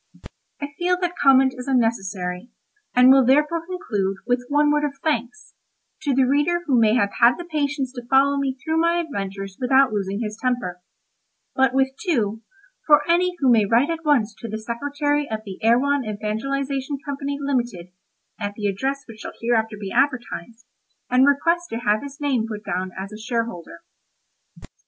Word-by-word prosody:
I 285 - -4
feel 360 +1 +2
that 355 -1 -2
comment 265 -1 +5
is 250 +1 -8
unnecessary, 200 -6 -1 0.5
and 250 +1 +7
will 270 0 +6
therefore 300 +6 +2
conclude 205 - -2
with 245 +1 0
one 295 +1 +3
word 295 0 +1
of 285 -1 -2
thanks 285 -1 -2 0.5
to 285 -4 0
the 265 - +4
reader 295 +6 +1
who 265 -6 +3
may 220 0 +4
have 200 -5 +2
had 245 +4 +5
the 350 - -7
patience 290 -5 -2
to 245 -2 -9
follow 275 +1 +4
me 275 -2 -1
through 320 +4 -1
my 335 +1 +2
adventures 195 - -5
without 265 -1 +4
losing 200 0 -2
his 215 -1 -5
temper; 240 -9 -2 0.7
but 265 -1 +2
with 265 0 +3
two, 225 - 0 0.5
for 300 +2 +5
any 355 +1 +2
who 270 -5 +3
may 225 -3 +5
write 235 +9 +2
at 330 0 -4
once 255 -8 +2
to 230 - -6
the 215 - -3
Secretary 285 +6 -2
of 220 -1 -3
the 195 0 -9
Erewhon 265 +5 +3
Evangelisation 265 +6 -3
Company, 280 0 -3
limited 240 -11 -2 0.5
(at 205 0 -4
the 210 - -5
address 265 +8 -1
which 225 -2 -12
shall - - -7
hereafter 225 -2 0
be 195 -2 -6
advertised), 240 -3 -1 0.5
and 255 +2 +5
request 335 +5 +2
to 225 - -4
have 215 -3 +1
his 280 0 -9
name 265 -6 0
put 210 -1 -6
down 185 +1 -2
as 195 +2 -6
a 215 - -9
shareholder. 230 -6 -4
255 Hz, 175 wpm, -22 LUFS, 220-285 Hz, 0.7 s, and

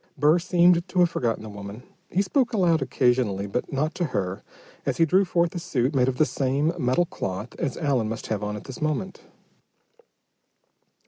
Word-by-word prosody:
Burr 155 +4 +4
seemed 175 0 +3
to 180 - -1
have 175 -1 +4
forgotten 115 -7 -1
the 110 - -7
woman. 100 +3 -9 0.3
He 195 - +1
spoke 250 +4 +1
aloud 175 -7 +3
occasionally, 125 -6 +1
but 110 +5 -3
not 150 +4 -1
to 175 - -1
her, 95 - -3 0.4
as - - -1
he 165 - +5
drew 190 +5 +3
forth 170 -1 +1
a 175 - -3
suit 140 -6 -1
made 130 -2 +3
of 130 -1 -1
the 155 - +4
same 140 +3 0
metal 130 +6 +2
cloth 105 - -5
as 135 - -2
Allen 135 -8 0
must 115 - -5
have 105 -1 -3
on 105 0 -3
at 105 - -7
this 130 - -9
moment. 155 +5 -2
140 Hz, 190 wpm, -25 LUFS, 115-175 Hz, 0.4 s, he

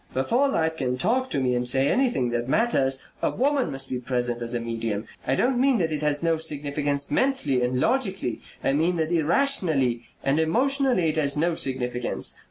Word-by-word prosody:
Before 240 - +2
life 160 -8 0
can 125 -3 -1
talk 250 - 0
to - - -1
me 130 -1 +1
and 125 0 0
say 135 +2 +2
anything 240 - +1
that 120 +1 -2
matters 135 - +1 0.2
a - - +1
woman 275 0 0
must 135 0 -4
be 125 - -3
present 120 -1 -2
as 120 +1 -2
a - - 0
medium. 115 -2 -3 0.2
I 130 - +2
don't 250 - +1
mean 270 -2 +3
that 165 -5 0
it 150 -1 -2
has 150 0 0
no 165 -1 +2
significance 145 -2 -1
mentally 260 - +1
and 125 +1 0
logically; 195 - 0 0.2
I 135 - +1
mean 165 +5 +1
that 160 0 -1
irrationally 160 - +2 0.2
and 140 +3 +1
emotionally 250 - +2
it 155 - -3
has 145 -2 +1
no 170 +3 +1
significance. 125 -4 -2
150 Hz, 190 wpm, -25 LUFS, 125-210 Hz, 0.2 s, mean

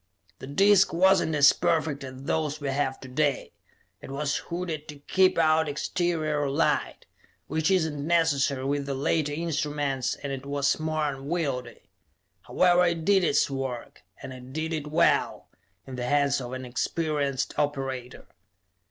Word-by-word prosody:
The - - -9
disc 195 +7 +4
was 190 +2 +4
not 160 - -2
as 145 -1 +7
perfect 155 -3 0
as 130 0 -9
those 150 +1 -1
we 145 -2 -3
have 135 -1 -1
to 130 - -9
day; 140 +2 -1 0.5
it - - -10
was 140 +1 -1
hooded 170 -3 -5
to 150 - -8
keep 185 +6 +2
out 160 -1 +3
exterior 155 -2 -1
light, 150 +4 0 0.4
which 160 0 -1
is 185 -4 +3
not 150 -2 -6
necessary 145 -4 +1
with 140 0 -1
the 140 - -2
later 145 +2 0
instruments, 145 -4 -2
and 140 -1 -5
it 135 -1 -6
was 140 +1 0
more 155 -1 -1
unwieldy. 135 -4 -4 0.6
However, 180 0 +3
it 165 -2 -2
did 195 -1 +4
its 155 - +3
work, 130 -3 -5 0.2
and 130 0 -9
did 160 +3 -3
it 150 -2 -3
well, 160 +3 +1 0.4
in 130 -1 -8
the 125 - -3
hands 140 +1 +2
of 125 0 -7
an 130 0 -5
experienced 140 +1 -2
operator. 135 -3 -3
145 Hz, 155 wpm, -26 LUFS, 135-160 Hz, 0.6 s, as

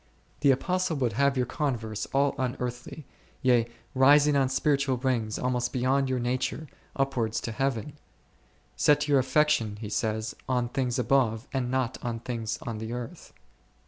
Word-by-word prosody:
The 145 - +3
Apostle 175 +4 +1
would 125 -6 0
have 140 +3 +2
your 125 - +2
con 140 0 -1
verse 110 -2 -5
all 140 +1 +1
unearthly, 125 +3 -4 0.4
yea, 120 -3 +4 0.3
rising 145 +2 +5
on 135 -2 +3
spiritual 140 -1 +1
wings 120 -4 -1
almost 125 -1 -1
beyond 135 +1 +1
your 130 - 0
nature, 125 +4 -2 0.3
upwards 125 -5 0
to 115 - -4
Heaven; 135 +2 -2 0.8
Set 150 0 +3
your 140 -2 +4
affection, 130 -6 +2
he 105 -2 -6
says, 110 0 -2
on 125 -2 +1
things 125 -2 -1
above, 125 -2 +1
and 130 -2 -1
not 130 -1 -1
on 115 -2 -3
things 115 -2 -4
on 115 -3 -5
the 110 +1 -5
earth. 120 -1 -7
130 Hz, 155 wpm, -27 LUFS, 115-140 Hz, 0.8 s, rising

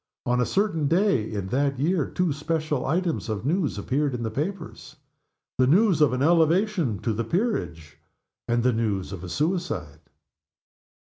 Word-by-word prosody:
On 125 0 +1
a 120 - +1
certain 175 - 0
day 165 - +2
in 100 -3 -4
that 140 +2 0
year 155 +3 +1
two 180 -4 0
special 155 -2 -2
items 165 -3 -1
of 110 +1 -3
news 160 - 0
appeared 135 +6 -1
in 120 - -4
the 110 - -2
papers 155 - -5 0.6
the 130 - +4
news 180 - +4
of 150 - +5
an 130 +1 0
elevation 170 - +2
to 115 - -1
the 115 +3 -2
peerage, 115 - -2 0.5
and 120 0 +1
the 125 0 +3
news 105 -5 -1
of 95 -2 -7
a 90 - -6
suicide. 150 - -2
140 Hz, 165 wpm, -25 LUFS, 115-170 Hz, 0.6 s, of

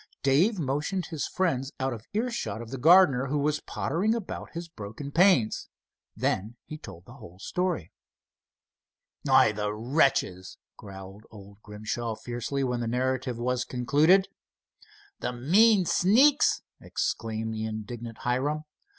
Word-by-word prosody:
Dave 165 +11 +3
motioned 150 +5 -2
his 160 -4 -4
friends 140 -8 -1
out 130 -1 -1
of 110 -1 -10
earshot 235 - -2
of 115 0 -9
the 135 - -5
gardener, 145 -4 +5
who 145 +3 -1
was 150 +1 0
pottering 190 +12 -1
about 225 -5 -6
his 170 0 -6
broken 120 0 -8
panes. 170 - +3 0.5
Then 105 +5 -1
he 155 - -8
told 90 - -11
the 120 - -13
whole 105 -9 -13
story. 180 - -2 1.3
"Why, 110 - +5
the 105 0 -2
wretches!" 110 - 0 0.2
growled 95 +1 -11
old 100 -1 -14
Grimshaw, 110 +2 -4
fiercely, 120 +4 -4
when 125 -2 -1
the 120 - -2
narrative 130 0 -1
was 125 +1 -1
concluded. 150 +11 +3 0.9
"The 125 - -3
mean 190 - +4
sneaks!" 250 - +4 0.2
exclaimed 110 0 -3
the 110 0 -3
indignant 110 +1 -6
Hiram. 140 +5 0
130 Hz, 135 wpm, -27 LUFS, 110-160 Hz, 1.3 s, gardener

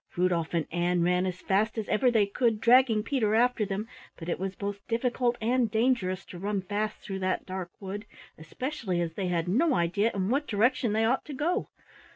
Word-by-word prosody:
Rudolf 175 -2 +1
and 165 -3 +1
Ann 175 +1 +1
ran 180 +1 +2
as 185 0 -5
fast 215 +4 +1
as 220 - -3
ever 250 +4 +3
they 220 -4 +3
could, 220 +2 0
dragging 235 -2 +5
Peter 220 -5 +1
after 235 -2 +2
them, 200 +3 -3 0.3
but 165 0 -7
it - - -1
was 190 0 -3
both 200 0 -4
difficult 240 +1 0
and 235 +1 +1
dangerous 220 -5 +1
to 175 - -10
run 200 0 -2
fast 210 +2 -3
through 195 -1 -5
that 185 0 -1
dark 185 -2 -5
wood, 205 +2 -6 0.3
especially 190 - -4
as 170 -1 -2
they 190 +1 -2
had 170 -1 -1
no 265 - +2
idea 185 +6 +1
in 190 0 -1
what 280 +4 0
direction 230 +2 +2
they 220 +1 +2
ought 255 +4 +1
to 295 - -7
go. 305 +6 -1
210 Hz, 200 wpm, -28 LUFS, 185-235 Hz, 0.3 s, dragging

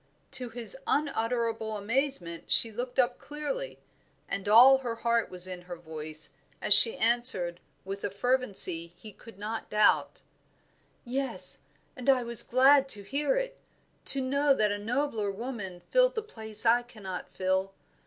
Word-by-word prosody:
To 250 -2 -2
his 230 -1 -2
unutterable 230 -5 -2
amazement 205 -6 -3
she 225 - +3
looked 245 +3 -6
up 250 -1 +1
clearly, 400 +13 -6 0.5
and 200 +1 -4
all 255 +5 +7
her 240 -3 -5
heart 235 0 -1
was 180 0 +1
in 185 -1 -5
her 175 0 -9
voice, 155 -2 -5 0.3
as - - +2
she 460 - +8
answered 225 -8 +2 0.3
with 195 +1 -7
a - - -2
fervency 200 -7 -1
he 215 +3 -12
could 230 -4 -16
not 220 +2 -6
doubt 210 0 +1 0.8
"Yes; 265 +2 -1 0.4
and 250 +1 -4
I 260 -2 +3
was 235 0 +6
glad 270 +3 +3
to 205 -5 -2
hear, 295 - -2 0.5
to 275 - +9
know 280 +2 +1
that 210 -4 +1
a 205 - -3
nobler 225 -1 -2
woman 200 -4 -7
filled - - +3
the 440 - -3
place 220 - 0
I 235 +2 +4
cannot 210 -7 -9
fill. 190 +1 -2
230 Hz, 150 wpm, -28 LUFS, 200-265 Hz, 0.8 s, to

